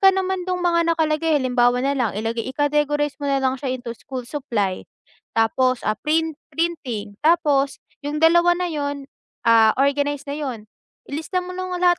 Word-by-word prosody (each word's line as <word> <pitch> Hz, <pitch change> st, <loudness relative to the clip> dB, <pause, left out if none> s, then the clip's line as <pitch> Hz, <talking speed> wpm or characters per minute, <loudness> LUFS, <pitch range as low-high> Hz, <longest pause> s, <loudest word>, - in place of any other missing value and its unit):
ka 390 Hz, -, +7 dB
naman 380 Hz, -1 st, -1 dB
dun 360 Hz, -1 st, -1 dB
mga 340 Hz, -1 st, +3 dB
nakalagay 315 Hz, -1 st, +1 dB
halimbawa 245 Hz, -1 st, +2 dB
nalang 270 Hz, -6 st, 0 dB
ilagay 225 Hz, +2 st, -2 dB
i-categorize 295 Hz, 0 st, +1 dB
mo 285 Hz, -, -2 dB
nalang 265 Hz, -1 st, +1 dB
siya 275 Hz, -, -3 dB
into 245 Hz, -2 st, -6 dB
school 260 Hz, -3 st, -6 dB
supply. 235 Hz, -9 st, -2 dB, 0.5 s
Tapos 250 Hz, +3 st, +2 dB
ah, 215 Hz, 0 st, 0 dB
print 320 Hz, 0 st, 0 dB, 0.2 s
printing, 245 Hz, -12 st, -3 dB
tapos 295 Hz, -4 st, +2 dB, 0.2 s
yung 300 Hz, +1 st, -3 dB
dalawa 345 Hz, +2 st, +5 dB
na 360 Hz, 0 st, -2 dB
yun, 285 Hz, -2 st, -3 dB, 0.4 s
ah, 225 Hz, -1 st, +5 dB
organize 285 Hz, +1 st, +1 dB
na 280 Hz, -, -3 dB
yun, 250 Hz, -8 st, -5 dB, 0.4 s
i-lista 320 Hz, +6 st, -2 dB
mo 360 Hz, 0 st, -8 dB
ng 370 Hz, -1 st, -3 dB
lahat 355 Hz, -1 st, +4 dB
290 Hz, 160 wpm, -22 LUFS, 255-325 Hz, 0.5 s, ka